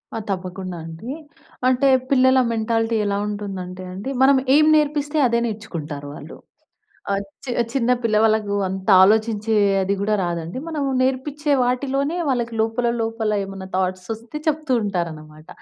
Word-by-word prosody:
ఆ! -, -, -2 dB
తప్పకుండా 185 Hz, -1 st, -5 dB
అండీ. 165 Hz, +10 st, -7 dB, 0.6 s
అంటే, 260 Hz, +2 st, +3 dB, 0.2 s
పిల్లల 260 Hz, -1 st, +5 dB
మెంటాలిటీ 225 Hz, 0 st, 0 dB
ఎలా 200 Hz, 0 st, 0 dB
ఉంటుందంటే 190 Hz, -3 st, -5 dB
అండి, 200 Hz, +8 st, -5 dB
మనం 270 Hz, 0 st, +6 dB, 0.2 s
ఏం 305 Hz, -, +6 dB
నేర్పిస్తే 295 Hz, 0 st, +1 dB
అదే 235 Hz, 0 st, +1 dB
నేర్చుకుంటారు 165 Hz, -10 st, -5 dB
వాళ్ళు. -, -, -10 dB, 0.7 s
ఆహ్, 200 Hz, 0 st, 0 dB, 0.2 s
చి 250 Hz, -, -3 dB, 0.2 s
చిన్న 250 Hz, -2 st, +1 dB
పిల్ల 220 Hz, -2 st, +1 dB
వాళ్ళకూ 215 Hz, -2 st, +2 dB
అంత 190 Hz, +2 st, -4 dB
ఆలోచించే 220 Hz, +1 st, +2 dB, 0.3 s
అది 195 Hz, +1 st, 0 dB
గూడా 210 Hz, +1 st, +1 dB
రాదండి. 170 Hz, +2 st, -4 dB
మనం 310 Hz, -3 st, -2 dB, 0.2 s
నేర్పిచ్చే 285 Hz, +3 st, 0 dB
వాటిలోనే 275 Hz, +6 st, 0 dB
వాళ్ళకి 240 Hz, -3 st, -1 dB
లోపల, 225 Hz, +2 st, 0 dB
లోపల 225 Hz, -1 st, -1 dB
ఏమన్నా 195 Hz, -1 st, -8 dB
థాట్సొస్తే 190 Hz, +8 st, -3 dB
చెప్తూ 305 Hz, -2 st, 0 dB
ఉంటారనమాట. 160 Hz, -5 st, -5 dB
220 Hz, 135 wpm, -21 LUFS, 190-260 Hz, 0.7 s, మనం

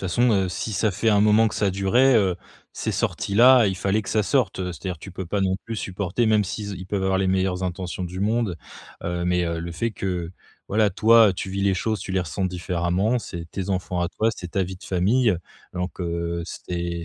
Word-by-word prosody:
façon, 120 Hz, +7 st, +3 dB
heu, 95 Hz, -2 st, +2 dB
si 100 Hz, +4 st, -4 dB
ça 105 Hz, +2 st, +1 dB
fait 100 Hz, +4 st, 0 dB
un 105 Hz, -1 st, +4 dB
moment 105 Hz, +2 st, +5 dB
que -, -, -8 dB
ça 100 Hz, -2 st, +1 dB
durait, 115 Hz, +8 st, +3 dB
heu, 95 Hz, -5 st, +2 dB, 0.4 s
c'est -, -, -3 dB
sorti 100 Hz, -, -2 dB
là, 125 Hz, +1 st, +7 dB
il 95 Hz, -1 st, -1 dB
fallait 100 Hz, +3 st, 0 dB
que -, -, -10 dB
ça 110 Hz, -, +2 dB
sorte, 115 Hz, -3 st, +1 dB
heu, 90 Hz, -1 st, -3 dB
c'est-à-dire 90 Hz, +3 st, -5 dB
que 80 Hz, -, -19 dB
tu 95 Hz, -, -9 dB
peux 95 Hz, -1 st, -6 dB
pas 100 Hz, +4 st, -1 dB
non 95 Hz, -1 st, +1 dB
plus 115 Hz, -, -5 dB
supporter, 100 Hz, +3 st, -1 dB
même 110 Hz, -1 st, +4 dB
s'il 105 Hz, +2 st, -5 dB
z 100 Hz, -, -5 dB
ils 90 Hz, +1 st, -8 dB
peuvent 100 Hz, 0 st, -2 dB
avoir 95 Hz, 0 st, +1 dB
les 95 Hz, -, +1 dB
meilleures 95 Hz, -1 st, 0 dB
intentions 90 Hz, 0 st, -3 dB
du 90 Hz, +1 st, -6 dB
monde 105 Hz, -3 st, 0 dB, 0.5 s
heu, 85 Hz, 0 st, -2 dB
mais, 90 Hz, 0 st, +1 dB
heu, 85 Hz, -1 st, -2 dB
le 85 Hz, +1 st, -5 dB
fait 115 Hz, +8 st, -1 dB
que, 90 Hz, -5 st, -3 dB, 0.4 s
voilà, 105 Hz, 0 st, +2 dB
toi 110 Hz, +2 st, +6 dB
tu 95 Hz, +1 st, -5 dB
vis 100 Hz, +1 st, -2 dB
les 100 Hz, -1 st, +3 dB
choses, 110 Hz, +1 st, -1 dB
tu 95 Hz, -1 st, -5 dB
les 95 Hz, -, +2 dB
ressens 90 Hz, +2 st, -3 dB
différemment, 90 Hz, +5 st, 0 dB
c'est 85 Hz, -6 st, -7 dB
tes 95 Hz, 0 st, -4 dB
enfants 90 Hz, -1 st, -2 dB
à 85 Hz, -, 0 dB
toi, 110 Hz, +5 st, 0 dB
c'est 90 Hz, -, -7 dB
ta 95 Hz, -, +1 dB
vie 95 Hz, +1 st, -7 dB
de -, -, -15 dB
famille 105 Hz, +5 st, +2 dB, 0.4 s
donc, 90 Hz, +1 st, -4 dB
heu 85 Hz, 0 st, -2 dB
c'est 85 Hz, -1 st, -5 dB
95 Hz, 240 wpm, -24 LUFS, 90-105 Hz, 0.5 s, là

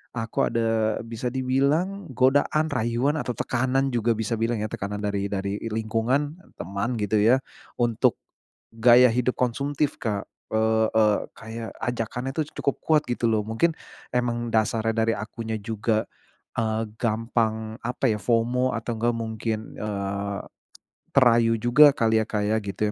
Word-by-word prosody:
aku 115 Hz, -1 st, 0 dB
ada 115 Hz, -2 st, 0 dB
bisa 115 Hz, +1 st, -5 dB
dibilang 140 Hz, +9 st, 0 dB
godaan, 145 Hz, +4 st, +2 dB
rayuan, 125 Hz, +4 st, 0 dB
atau 125 Hz, -, -2 dB
tekanan, 130 Hz, +4 st, 0 dB
juga 120 Hz, -1 st, +1 dB
bisa 110 Hz, +1 st, -2 dB
bilang, 115 Hz, -1 st, 0 dB
ya, 110 Hz, -, -3 dB
tekanan 105 Hz, +1 st, -4 dB
dari 100 Hz, -1 st, -1 dB
dari 100 Hz, 0 st, -2 dB
lingkungan, 115 Hz, +7 st, -1 dB, 0.2 s
teman, 100 Hz, +7 st, -3 dB
gitu 105 Hz, +1 st, +1 dB
ya. 120 Hz, +6 st, +4 dB, 0.3 s
Untuk, 120 Hz, -2 st, +2 dB, 0.6 s
gaya 120 Hz, +2 st, +6 dB
hidup 125 Hz, +2 st, 0 dB
konsumtif, 140 Hz, +4 st, -1 dB
Kak, 105 Hz, -3 st, -2 dB, 0.3 s
eee, 110 Hz, -1 st, +3 dB
kayak 115 Hz, 0 st, -7 dB, 0.2 s
ajakannya 125 Hz, +2 st, -3 dB
tuh, 155 Hz, +1 st, -1 dB
cukup 140 Hz, -, -1 dB
kuat 155 Hz, -2 st, +3 dB
gitu 120 Hz, -1 st, 0 dB
loh. 110 Hz, -2 st, +2 dB
Mungkin, 115 Hz, +10 st, 0 dB, 0.4 s
emang 120 Hz, -1 st, 0 dB
dasarnya 110 Hz, 0 st, +1 dB
dari 115 Hz, 0 st, +2 dB
akunya 110 Hz, +1 st, -5 dB
juga, 110 Hz, 0 st, -1 dB, 0.5 s
eee, 110 Hz, 0 st, -1 dB
gampang, 110 Hz, -1 st, -1 dB
apa 125 Hz, +2 st, 0 dB
ya, 105 Hz, -, 0 dB
FOMO, 120 Hz, +4 st, +1 dB
atau, 115 Hz, 0 st, -3 dB
nggak 120 Hz, +1 st, +1 dB
mungkin, 110 Hz, -1 st, -3 dB, 0.2 s
eee, 100 Hz, -1 st, -3 dB, 0.7 s
terayu 115 Hz, -3 st, +4 dB
juga 120 Hz, +6 st, +7 dB
kali, 110 Hz, -5 st, +2 dB
ya, -, -, -2 dB
Kak, 105 Hz, -2 st, -1 dB
ya, -, -, +3 dB
gitu 100 Hz, +1 st, -2 dB
115 Hz, 140 wpm, -25 LUFS, 110-125 Hz, 0.7 s, juga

